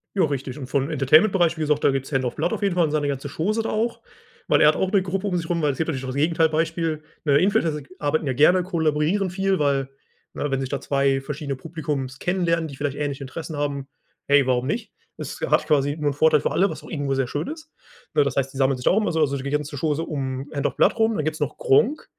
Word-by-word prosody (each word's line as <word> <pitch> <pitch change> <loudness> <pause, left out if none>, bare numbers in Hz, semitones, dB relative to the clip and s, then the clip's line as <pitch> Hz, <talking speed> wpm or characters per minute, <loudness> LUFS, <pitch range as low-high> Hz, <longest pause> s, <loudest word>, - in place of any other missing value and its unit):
Ja 195 - +3
richtig 140 -3 -2
und 135 -4 -7
von 135 +1 +1
dem 145 - -4
Entertainment 155 +8 +5
Bereich, 175 -3 +2
wie - - -4
gesagt, 150 -1 +1
da - - +5
gibt's 135 +1 -3
HandsOfBlood 135 - -1
auf 215 - -3
jeden 195 -3 +1
Fall 175 -2 +4
und 150 - -2
seine 150 -1 0
ganze 140 0 -3
Chose 205 +11 -1
da 225 - -3
auch, 230 +2 -1 0.5
weil - - +4
er - - +7
hat - - +2
auch 190 - -1
'ne 200 -2 +4
Gruppe 190 +2 -2
um 180 -3 0
sich 165 -1 -4
rum, 170 -1 0
weil 150 -2 +2
es - - -10
gibt 160 - -1
natürlich 135 -5 -3
auch - - -4
das 130 - -4
Gegenteil 160 +2 +2
Beispiel. 160 0 -1 0.2
Ne, 140 -2 +4
Influencer 165 -4 +1
g 135 - -18
arbeiten 150 +2 0
ja 135 - 0
gerne, 175 +7 +4
kollaborieren 165 +2 0
viel, 190 +1 0
weil, 140 -2 +1 0.4
ne, 145 - -3
wenn 135 -1 0
sich 135 -1 -3
da 140 - -2
2 140 -1 +1
verschiedene 140 0 -4
Publika 145 -3 -4
kennenlernen, 170 -3 0
die 140 - -9
vielleicht 145 -1 -3
ähnliche 145 -2 -3
Interessen 155 +3 -7
haben, 140 -2 -2 0.4
hey, 140 -2 +4
warum 125 -1 +1
nicht? 215 - -3 0.3
Es - - -6
hat - - +1
quasi 145 -1 +2
nur 150 -2 0
'n - - -5
Vorteil 155 +3 +4
für - - -1
alle, 195 +2 +2
was - - -7
auch - - -12
irgendwo 145 -3 -2
sehr 135 -2 0
schön 145 +5 -3
ist. 315 0 -8 0.4
Ne, 145 - +4
das 140 - -2
heißt, 135 -1 0
die - - -8
sammeln 135 -1 +2
sich 125 - -8
da - - +5
auch 195 - +2
immer 210 - 0
so, 160 - -1
also 140 -3 +2
die 135 +1 -4
ganze 150 0 -2
Chose 155 +2 0
um 135 -3 -4
HandsOfBlood 145 +9 +1
rum. 225 0 +2
Dann 150 - -1
gibt's 155 0 -2
noch 150 -1 -2
Gronkh 230 - +2
150 Hz, 265 wpm, -23 LUFS, 140-170 Hz, 0.5 s, er